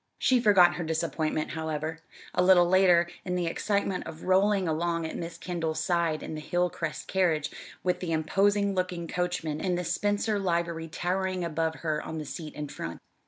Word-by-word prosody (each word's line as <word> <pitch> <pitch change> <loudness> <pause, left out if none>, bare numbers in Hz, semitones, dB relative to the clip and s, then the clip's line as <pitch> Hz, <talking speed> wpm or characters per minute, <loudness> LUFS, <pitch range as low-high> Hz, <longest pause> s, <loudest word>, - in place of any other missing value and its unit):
She 255 -1 +3
forgot 185 -6 +5
her 175 - -2
disappointment, 160 -1 -1
however, 160 0 -3 0.3
a 180 - +2
little 180 -1 +6
later, 180 -2 +5 0.2
in 180 -1 -2
the 180 -1 0
excitement 195 +2 -1
of 155 - -9
rolling 190 0 +3
along 165 +1 0
at 160 - -5
Miss 170 0 -5
Kendall's 165 -3 -3
side 170 -3 0
in - - -5
the 155 - -5
Hilcrest 175 -1 -2
carriage, 170 -6 +1 0.3
with 180 -1 +1
the 180 -2 -3
imposing 200 +6 +2
looking 180 -2 -2
coachman 175 -3 -2
in 180 -2 0
the 180 - -2
Spencer 205 +4 0
livery 170 -3 -1
towering 185 +2 -1
above 160 -1 -1
her 155 -2 -1
on 160 - -6
the 155 - -4
seat 155 +1 -7
in 150 0 -4
front. 85 -10 -6
175 Hz, 175 wpm, -28 LUFS, 160-185 Hz, 0.3 s, little